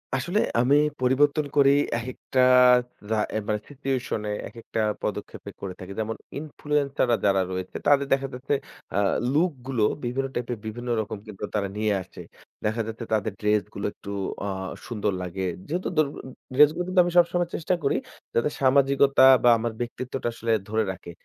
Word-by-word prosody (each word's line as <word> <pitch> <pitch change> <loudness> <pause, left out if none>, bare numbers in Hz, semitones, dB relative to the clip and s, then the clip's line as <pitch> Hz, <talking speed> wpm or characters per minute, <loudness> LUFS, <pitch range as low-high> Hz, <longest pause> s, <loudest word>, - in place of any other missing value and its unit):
আসলে 175 - 0 0.2
আমি 130 +4 +4 0.3
পরিবর্তন 145 +4 +3
করি 140 -1 +6 0.3
একেকটা 130 +2 -4 0.7
আ - - +2 0.3
মানে 105 -1 0
সিচুয়েশন 135 -5 -2
এ - - -1 0.2
একেকটা 115 0 -6 0.2
পদক্ষেপে - - -5
করে 95 -2 -4
থাকি। 95 +1 -8
যেমন 110 +1 -2 0.2
ইনফ্লুয়েন্সার 145 -3 -1
রা 115 - +5
যারা 95 -1 +4
রয়েছে 95 0 -5
তাদের 140 -1 +4
দেখা 135 0 0
যাচ্ছে 125 +3 -2 0.4
আ - - +1 0.3
লুক 165 +4 +3 0.2
গুলো 125 -5 0 0.2
বিভিন্ন 130 +3 -1
টাইপের 120 -1 -2
বিভিন্ন 120 +3 -5
রকম 110 0 -5
কিন্তু 105 -1 -9
তারা 100 -2 0
নিয়ে 105 -1 +1
আসে। - - -12 0.4
দেখা 110 +2 0
যাচ্ছে 115 +1 -6
তাদের 110 -1 0
ড্রেস 105 0 +2
গুলো - - -4
একটু 100 - -11 0.4
আ - - -2 0.4
সুন্দর 105 -4 -1
লাগে। 90 +1 -4 0.2
যেহেতু 175 +5 -2 0.7
ড্রেস 150 +2 +8
গুলো 180 - -1
কিন্তু 185 -1 +4
আমি 175 - -1
সবসময় 175 0 +3
চেষ্টা 170 +2 0
করি 140 - +2 0.4
যাতে 120 +6 +2
সামাজিকতা 135 0 +4 0.2
বা 120 - +7
আমার 115 +1 -2
ব্যক্তিত্বটা 125 +1 -4
আসলে 115 0 -2 0.2
ধরে 110 +1 +1
রাখে। 85 -2 -9
125 Hz, 160 wpm, -25 LUFS, 110-140 Hz, 0.7 s, ড্রেস